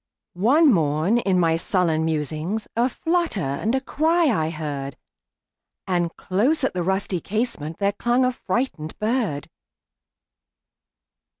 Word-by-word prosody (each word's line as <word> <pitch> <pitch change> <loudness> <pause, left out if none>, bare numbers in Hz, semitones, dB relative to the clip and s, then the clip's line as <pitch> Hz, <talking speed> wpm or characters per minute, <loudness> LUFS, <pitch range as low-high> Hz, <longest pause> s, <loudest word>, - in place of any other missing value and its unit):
One 265 - +4
morn, 160 +6 +2
in 190 -5 +1
my 165 -2 +3
sullen 165 -3 +1
musings,A 160 - -1
flutter 335 - 0
and 215 - -1
cry 320 0 +2
I 160 -7 0
heard; 145 -4 -5 0.9
And 175 -2 0
close 245 +12 +1
at 265 - +1
the 180 - -2
rusty 190 0 -1
casementThere 200 -3 -2
clung 245 +2 +2
a 255 - +2
frightened 235 - -3
bird. 215 - -1
190 Hz, 110 wpm, -23 LUFS, 160-245 Hz, 0.9 s, One